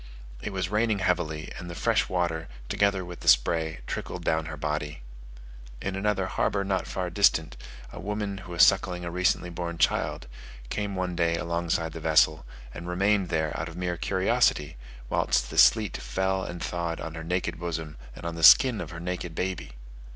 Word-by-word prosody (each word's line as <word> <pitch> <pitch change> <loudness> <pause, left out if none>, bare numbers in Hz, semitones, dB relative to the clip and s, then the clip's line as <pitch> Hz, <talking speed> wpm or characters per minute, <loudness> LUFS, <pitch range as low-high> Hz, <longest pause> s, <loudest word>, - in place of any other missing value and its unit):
It - - -4
was 95 -2 -2
raining 105 +1 +1
heavily, 85 -5 -1
and 90 0 -7
the 85 - -7
fresh - - +1
water, 85 -3 -1 0.2
together 100 -2 +1
with 90 0 -9
the - - -10
spray, 80 +6 +3
trickled - - -5
down 80 0 0
her 80 -1 -6
body. 75 -3 -3 0.8
In 95 0 -3
another 95 -1 0
harbour 100 +1 0
not 95 -2 -1
far 90 -2 -3
distant, 80 - +3 0.4
a - - -8
woman, 105 0 -3
who 90 -1 -9
was 85 - +6
suckling 90 -2 +3
a 85 - -4
recently 90 0 +1
born 85 0 -4
child, - - +1 0.5
came 100 -2 -2
one 90 -1 -2
day 85 -1 +2
alongside 85 -1 -1
the - - -6
vessel, 80 -1 +3 0.3
and 85 - -8
remained 100 +1 +2
there 80 -1 -1
out 80 +2 -3
of 80 - -10
mere 90 -1 -2
curiosity, 90 -5 +1 0.3
whilst - - +1
the - - -7
sleet - - +5
fell 95 +9 -1
and 90 -2 -6
thawed 85 -1 -3
on 80 - -6
her 80 -1 -7
naked 85 0 -2
bosom, 80 -3 -4 0.2
and - - -10
on 85 - -2
the 85 - -6
skin 120 +7 +7
of - - -6
her 85 0 -8
naked 90 -1 -4
baby! 90 -8 -3
85 Hz, 185 wpm, -27 LUFS, 80-95 Hz, 0.8 s, skin